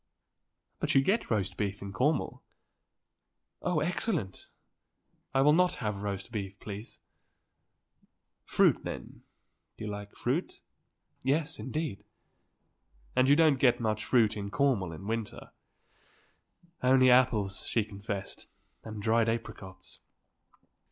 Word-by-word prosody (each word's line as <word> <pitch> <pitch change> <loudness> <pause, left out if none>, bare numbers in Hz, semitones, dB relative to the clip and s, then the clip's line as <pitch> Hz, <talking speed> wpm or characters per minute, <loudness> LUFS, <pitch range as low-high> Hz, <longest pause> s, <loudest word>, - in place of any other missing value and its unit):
"But - - 0
you 135 - +7
get 205 +9 +1
roast 100 -4 0
beef 100 -1 -2
in 100 0 -7
Cornwall." 145 +9 0 1.2
"Oh, 175 -4 0
excellent. 165 - -1 0.8
I 135 - +3
will 150 +2 +6
not 180 +2 +3
have 105 -3 -3
roast 100 +1 -4
beef, 100 -3 -5
please." 105 +2 -8 1.4
"Fruit, - - +3
then? - - -7 0.6
You - - -6
like 105 -1 -6
fruit?" - - -2 0.6
"Yes; 150 +4 0
indeed." 135 -7 -3 1.1
"And 130 +1 +4
you 145 - +7
don't 155 -4 +4
get 125 -1 +4
much 110 -2 -1
fruit 110 -3 +3
in 100 -1 -4
Cornwall 120 -8 +1
in 80 +4 -9
winter." 110 0 -4 1.3
"Only 130 0 +6
apples," 110 -6 +3
she 115 - +2
confessed, 100 -1 -6 0.4
"and 110 -2 -7
dried 115 +1 +3
apricots." 105 -4 -5
110 Hz, 115 wpm, -30 LUFS, 100-135 Hz, 1.4 s, you